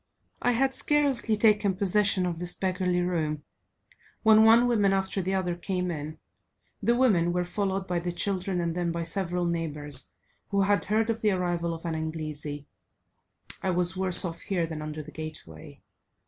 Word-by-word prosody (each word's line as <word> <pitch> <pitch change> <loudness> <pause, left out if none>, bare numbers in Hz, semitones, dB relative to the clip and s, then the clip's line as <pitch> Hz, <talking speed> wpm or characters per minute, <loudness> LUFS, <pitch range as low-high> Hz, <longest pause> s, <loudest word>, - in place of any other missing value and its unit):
I 245 - +2
had 265 +3 +2
scarcely 265 -6 +1
taken 210 -3 +3
possession 200 -1 +2
of 170 -2 -3
this 175 0 -3
beggarly 185 -1 0
room, 155 -4 -1 0.8
when 220 -1 +7
one 230 +2 +6
woman 205 -5 +3
after 195 0 -1
the 190 +1 -1
other 180 -2 0
came 180 0 -2
in; 155 0 -5 0.6
the 235 +4 +3
women 200 -10 +3
were 180 0 +1
followed 195 +1 -2
by 180 -2 -1
the 175 +1 -3
children, 185 0 -1
and 170 -1 -1
then 175 0 -1
by 170 0 -2
several 175 +1 -1
neighbours, 150 -5 -3 0.4
who 200 -1 +2
had 200 -2 +2
heard 220 +2 +1
of 225 0 -4
the 215 - +3
arrival 175 -3 0
of 165 +1 -7
an 165 - -1
Inglesi; 155 -2 -4 1.0
I 190 - -1
was 180 0 +1
worse 185 -1 0
off 165 -1 -5
here 180 -4 -1
than 160 -2 -6
under 155 0 -5
the 155 - -11
gateway. 155 - -9
180 Hz, 175 wpm, -27 LUFS, 165-200 Hz, 1.0 s, when